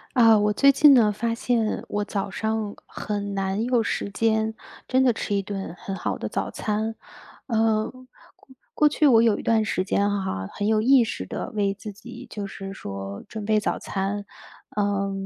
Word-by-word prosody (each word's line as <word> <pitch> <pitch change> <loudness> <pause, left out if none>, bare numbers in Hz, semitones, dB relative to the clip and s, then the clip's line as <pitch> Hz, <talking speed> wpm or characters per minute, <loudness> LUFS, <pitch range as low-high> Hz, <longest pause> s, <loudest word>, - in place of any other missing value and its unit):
啊， 225 -3 +7
我 210 0 +2
最 275 +5 +6
近 280 0 +7
呢， 220 -4 +5
发 230 +2 -2
现 230 -2 0
我 205 0 -1
早 200 -1 -3
上 220 +1 -2
很 205 -1 -4
难 195 +2 -1
有 245 -2 +2
时 200 - -2
间 220 +1 0 0.3
真 260 +1 +3
的 250 -2 +4
吃 210 -1 -2
一 200 - +1
顿 195 -3 -5
很 195 - -5
好 - - -3
的 - - -4
早 - - -2
餐。 220 +1 -2 0.5
呃， 220 -2 +1 0.8
过 300 - +4
去 305 - +1
我 230 -4 +6
有 230 -3 +3
一 - - -7
段 225 -1 +3
时 185 -3 -1
间 200 +1 +1
哈， 190 - -2
很 205 - -2
有 215 0 +3
意 260 +2 +6
识 225 - -5
地 - - -5
为 200 -2 0
自 205 +2 -8
己 240 +5 -11
就 205 -2 -5
是 195 0 -7
说 100 - -7
准 215 -2 -6
备 215 0 +3
早 210 - -1
餐。 200 +1 -3 0.5
呃， 200 -1 0
215 Hz, 200 characters per minute, -24 LUFS, 200-225 Hz, 0.8 s, 啊